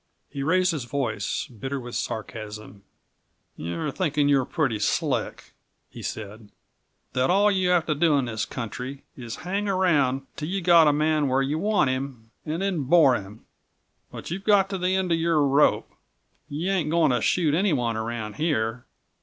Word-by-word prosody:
He 140 - -5
raised 180 +5 +2
his 150 -7 -4
voice, 120 -6 -2
bitter 135 +4 -5
with 120 -1 -9
sarcasm. 110 -2 -6 0.7
"You're 85 +1 -4
thinking 150 -6 0
that 145 - +3
you're 135 -2 +3
pretty 135 -10 -1
slick," 105 - -1 0.4
he - - -10
said; 105 0 -7 0.6
"that 130 +1 +1
all 200 +3 +4
you 185 -2 +1
have 175 -3 +3
to 155 - 0
do 150 0 +3
in 135 - 0
this 110 -2 -3
country 130 +3 -6
is 120 -3 -7
to - - -12
hang 200 +4 -2
around 150 -9 +2
till 150 - -5
you 195 +2 -1
get 170 -3 +6
a - - +6
man 150 0 +1
where 135 +1 +2
you 145 +3 -1
want 185 -8 +2
him 130 -4 -5 0.2
and 165 +5 -2
then 180 -8 -1
bore 150 -2 +5
him. 105 -1 -6 0.7
But - - -8
you've 190 +3 -4
got 200 -2 +3
to 190 - -3
the 180 +1 +1
end 190 -2 0
of 165 - +2
your 165 -2 +2
rope. 140 +2 +3 0.6
You 160 +6 -2
ain't 175 -6 0
going 165 -3 +3
to 125 - +1
shoot 160 -5 +2
anyone 145 - +1
around 110 -1 -4
here. 125 -7 -1
145 Hz, 180 wpm, -25 LUFS, 120-175 Hz, 0.7 s, get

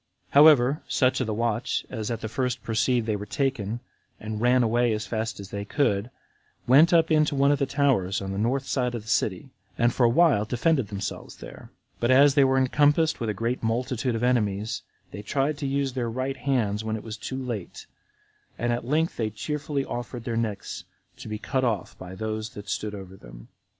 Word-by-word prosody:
35. - - -26
However, 145 -1 +6
such 130 0 +2
of 125 - -1
the 110 - -1
watch 115 +1 -1
as 110 0 -4
at 115 -2 -3
the 110 - -3
first 125 +1 -2
perceived 120 +1 +1
they 110 -2 0
were 105 0 -6
taken, 120 -4 -2 0.4
and 110 0 -5
ran 125 +1 +4
away 120 0 +2
as 105 0 -3
fast 110 +2 -3
as 100 -1 -9
they 100 0 -4
could, 105 -2 0 0.6
went 150 +8 +6
up 165 -1 +4
into 155 -1 +3
one 140 +1 +4
of 145 - +1
the 140 - +1
towers 130 -10 +1
on 95 -1 -5
the 95 - -3
north 130 +5 0
side 125 -3 -1
of 115 - -5
the - - -18
city, 110 +3 -1 0.3
and 120 +1 +2
for 125 - +1
a 120 - +6
while 135 -5 +4
defended 125 +3 +1
themselves 100 0 -6
there; - - -11 0.3
but 120 - 0
as 140 +2 +6
they 140 -1 +5
were 135 0 +3
encompassed 145 +4 +3
with 115 - -2
a 115 +4 -1
multitude 120 +2 -1
of 115 - -3
enemies, 110 -4 0 0.3
they 100 - -7
tried 140 +7 0
to 140 - -2
use 135 -1 -1
their 120 -3 -2
right 130 +3 -3
hands 110 -7 0
when 110 0 -2
it 110 - -6
was 110 -2 -6
too 130 +4 -6
late, 120 -8 -5 0.7
and 120 +1 0
at 120 - -3
length 155 +6 0
they 110 -2 0
cheerfully 145 +4 -3
offered 120 0 -5
their 115 -1 -3
necks 110 -3 -3 0.3
to - - -10
be 105 0 -4
cut 130 +4 -2
off 115 -5 -1
by 95 0 -8
those 110 +2 -4
that 105 0 -9
stood 105 +1 -3
over 95 -1 -9
them. - - -14
120 Hz, 210 wpm, -26 LUFS, 110-135 Hz, 0.7 s, However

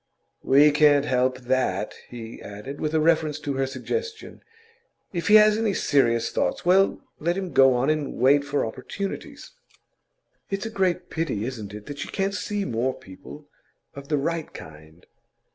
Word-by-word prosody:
'We 145 +3 +5
can't 145 -1 +4
help 130 -1 +1
that,' 120 -6 -1 0.2
he 115 -1 -9
added, 105 +8 -8
with 155 +1 -1
reference 155 -1 +2
to 145 -1 -3
her 135 0 -1
suggestion. 445 - -5 0.7
'If 170 -2 -3
he 210 - +7
has 215 0 +6
any 215 -4 0
serious 115 -5 +2
thoughts, - - -1
well, 190 +2 +3 0.2
let 170 +3 -1
him 190 -2 -4
go 135 -1 +6
on 130 +5 +2
and 155 -3 -2
wait 140 +3 +4
for 145 0 -1
opportunities.' 195 - -6 1.0
'It's 195 +1 -3
a 225 - -4
great 190 -4 -1
pity, 140 -10 -2
isn't 110 -6 -6
it, 105 0 -10
that 145 -1 -8
she - - -4
can't 195 0 -2
see 205 0 -3
more 125 +3 -1
people 95 +11 -13 0.5
of 140 0 -10
the 150 - +1
right 160 +3 -2
kind? 80 +2 -13
145 Hz, 160 wpm, -24 LUFS, 125-170 Hz, 1.0 s, he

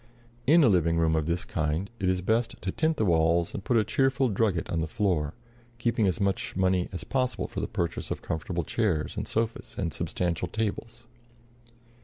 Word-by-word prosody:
In 160 +3 +7
a - - +6
living 85 -5 +3
room 80 -1 +3
of 80 -1 0
this 85 +1 -1
kind 80 +4 -1
it 95 -2 +1
is 90 -1 0
best 115 +4 0
to 95 - -1
tint 160 +5 +1
the 110 - +2
walls 85 -1 +2
and 100 - -5
put 120 - +2
a 110 - +4
cheerful 135 +2 +2
drugget 100 -5 +1
on 85 - 0
the 80 - -1
floor, 80 -4 0 0.4
keeping 115 -3 +1
as 95 - 0
much 100 -2 -1
money 95 -1 +1
as 90 - -5
possible 130 -1 -1
for - - -5
the - - -2
purchase 85 -1 -2
of - - -4
comfortable 85 +2 -2
chairs 90 -6 0
and - - -3
sofas 115 +1 -2
and 85 -6 -2
substantial 85 +5 -1
tables. 110 +4 -4
95 Hz, 195 wpm, -28 LUFS, 85-115 Hz, 0.4 s, In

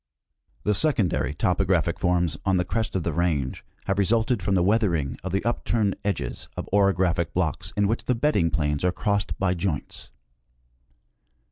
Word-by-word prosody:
The 105 - +2
secondary 90 - +1
topographic 90 0 +1
forms 90 -3 +1
on 95 -2 +2
the 90 - 0
crest 110 +4 -2
of 95 - 0
the - - -2
range 80 -7 -1 0.2
have 95 +1 0
resulted 110 +2 +2
from 95 +1 0
the 90 - +3
weathering 90 -9 +1
of 95 - -4
the 95 +3 -1
upturned 115 -3 0
edges 100 -1 -3
of - - -4
orographic 95 -3 +2
blocks 80 -6 -1
in 100 -1 +3
which 115 +3 -2
the 125 - +1
bedding 115 - +2
planes 75 -1 -1
are 90 - +3
crossed 100 +3 -1
by 95 -2 +1
joints. 85 -5 -3
95 Hz, 160 wpm, -25 LUFS, 85-105 Hz, 0.2 s, the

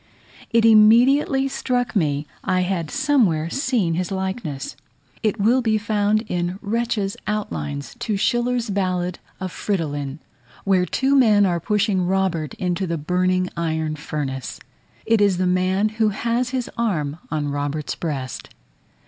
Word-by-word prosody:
It 230 -1 +3
immediately 245 +6 +5
struck 245 -3 -1
me 150 -6 +1 0.2
I 185 -1 +1
had 180 -4 -1
somewhere 175 - +2
seen 245 - 0
his 175 +1 -1
likeness: 190 - -4 0.5
it 220 0 0
will 235 +6 +3
be 220 -2 +2
found 215 0 +1
in 175 +1 -2
Retzch's 210 -2 -1
outlines 75 - -3
to 210 -3 -1
Schiller's 240 +1 0
ballad 180 -2 -1 0.2
of 185 -1 -4
Fridolin, 145 -9 -3 0.5
where 185 -2 +2
two 270 +1 +1
men 215 -6 +5
are 175 -2 +1
pushing 200 -1 +1
Robert 185 -5 0
into 180 +1 -1
the 170 0 -1
burning 185 +3 +1
iron 160 -2 -1
furnace. 140 -4 -4 0.5
It 225 -2 +3
is 200 -3 +3
the 185 - +1
man 185 +3 +2
who 220 0 +1
has 235 +4 -1
his 255 -2 -2
arm 160 -10 -1
on 150 -2 -2
Robert's 145 +1 -2
breast. 135 -6 -5
190 Hz, 140 wpm, -22 LUFS, 165-220 Hz, 0.5 s, immediately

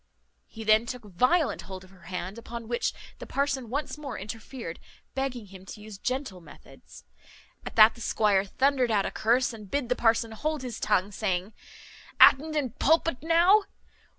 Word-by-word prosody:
He 225 - -9
then 215 +2 +4
took 250 -1 -6
violent 250 - +1
hold 190 +1 -9
of 185 - -17
her 180 -3 -17
hand; 185 +4 -5
upon 230 0 -8
which 240 +1 -1 0.3
the - - -9
parson 275 -4 -1
once 290 +3 -4
more 295 - -6
interfered, 215 -2 -7 0.3
begging 265 -4 -3
him 190 -1 -13
to - - -9
use 210 -2 -11
gentle 255 -8 -3
methods. 165 - -16 0.6
At - - -8
that 220 0 +8
the 235 - -14
squire 205 -3 +2
thundered 260 +4 +1
out 205 -3 +2
a - - -3
curse, 240 +2 +1
and 210 -3 -11
bid 280 -1 -2
the 250 - +2
parson 230 -1 +2
hold 300 +5 -3
his 240 -3 -6
tongue, 190 +3 +1
saying, 190 0 -2 0.7
"At'nt 310 +3 +6
in 275 -5 -1
pulpit 320 +2 +1
now? 345 +6 +4
230 Hz, 175 wpm, -27 LUFS, 205-270 Hz, 0.7 s, that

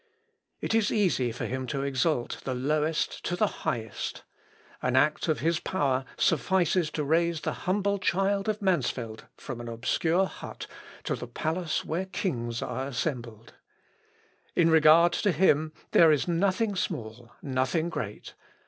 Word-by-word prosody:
It - - -1
is 225 -2 +2
easy 175 - +2
for 115 - -5
him 130 0 -3
to 140 0 -2
exalt 140 -1 0
the 130 - -2
lowest 150 +4 0
to 175 - -1
the 215 - +3 0.2
highest. 110 -3 -3 0.6
An 125 - 0
act 150 +5 +3
of 155 - 0
his 165 0 +1
power 135 -8 0
suffices 175 0 +2
to 150 - -1
raise 165 +2 +1
the - - -2 0.2
humble 200 +1 +1
child 195 +2 +1
of 210 0 -2
Mansfeld 125 - -1
from 120 -4 -7
an 120 - -7
obscure 160 +10 +1
hut - - -8 0.4
to - - -1
the 120 - -7
palace 160 +6 -2
where 180 +4 -2
kings 120 - -2
are 130 +2 -3
assembled. 120 -4 -4 1.0
In 165 -1 +4
regard 160 +2 +6
to 205 - +1
Him, 155 -2 +3 0.2
there 165 -2 +7
is 150 +1 +1
nothing 195 +5 +1
small, 120 -9 -4
nothing 135 +5 0
great. 105 - -5
155 Hz, 150 wpm, -28 LUFS, 130-180 Hz, 1.0 s, there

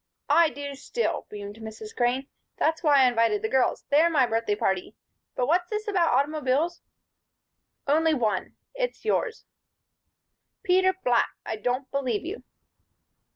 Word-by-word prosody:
"I 335 -2 +6
do 285 +1 -6
still," 285 - -3
beamed 205 0 -8
Mrs. 220 -1 -9
Crane. 250 +2 +1 0.3
"That's 320 0 +1
why 290 -4 +5
I - - +6
invited 230 -3 +1
the 220 - 0
girls; 265 -1 +1
they're 310 +4 +5
my 285 -6 +3
birthday 225 -2 0
party. 190 -3 -1 0.4
But 250 - +1
what's 350 +5 +1
this 425 0 -3
about 365 -5 +2
automobiles?" 300 +3 0 1.0
"Only 315 +2 +3
one. 225 -6 -1 0.2
It's - - -3
yours." 450 +1 -1 1.2
"Peter 375 +1 +3
Black! 240 -2 +3 0.2
I - - -3
don't 250 +5 -2
believe 260 -3 -1
you." 380 +6 -5
275 Hz, 140 wpm, -26 LUFS, 230-335 Hz, 1.2 s, I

